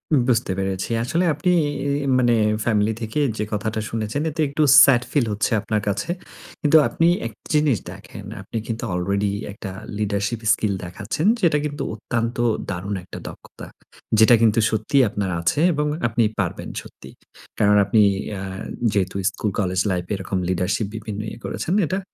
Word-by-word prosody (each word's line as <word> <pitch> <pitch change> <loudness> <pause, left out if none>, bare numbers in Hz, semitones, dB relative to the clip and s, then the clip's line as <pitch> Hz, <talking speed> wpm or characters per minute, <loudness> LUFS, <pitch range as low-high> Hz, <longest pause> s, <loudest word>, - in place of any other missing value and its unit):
উব 135 - +4
বুঝতে 115 -5 +1
পেরেছি। 95 -1 -2
আসলে 165 +9 0
আপনি 150 +5 0 0.2
এই 140 0 -2
ই - - -3
মানে 120 -2 +3 0.3
ফ্যামিলি 110 -1 +2
থেকে 110 +6 -2 0.2
যে 105 - -1
কথাটা 110 +1 -2
শুনেছেন 115 +5 -2
এতে 160 +1 -3
একটু 150 +2 +1 0.2
স্যাড 130 -4 +5
ফিল 145 -5 +2
হচ্ছে 105 - -1
আপনার 105 -1 -1
কাছে। 100 - -1 0.5
কিন্তু 150 +1 +5
আপনি 165 - +1 0.2
একটা 110 -1 -13
জিনিস 150 -5 +3
দেখেন, - - -11 0.2
আপনি - - -6
কিন্তু 115 0 -4
আলরেডি 100 +3 0 0.2
একটা 100 -1 -7 0.3
লিডারশিপ 105 +2 -1
স্কিল 105 -2 0
দেখাচ্ছেন 105 - -4 0.2
যেটা 165 -5 +3
কিন্তু 145 -1 -3
অত্যন্ত 115 +2 -3 0.3
দারুণ 95 +3 -3
একটা 90 - -9
দক্ষতা। - - -11 0.5
যেটা 110 +2 +7
কিন্তু 115 -1 +4
সত্যিই 110 +5 +2
আপনার 100 -1 -2
আছে 85 - +1
এবং 150 0 0 0.2
আপনি 115 0 +1 0.2
পারবেন - - -2
সত্যিই। - - -14 0.4
কারণ 105 0 +4
আপনি 110 +2 +3 0.4
আ - - -6 0.5
যেহেতু 95 -2 -1
স্কুল 100 +2 -3
কলেজ 95 -2 0
লাইফ 90 -1 -2
এরকম 95 0 -3
লিডারশিপ 95 +3 0
বিভিন্ন 110 -1 -6 0.3
করেছেন। 175 - -2
এটা 185 +5 -1
110 Hz, 160 wpm, -22 LUFS, 100-135 Hz, 0.5 s, যেটা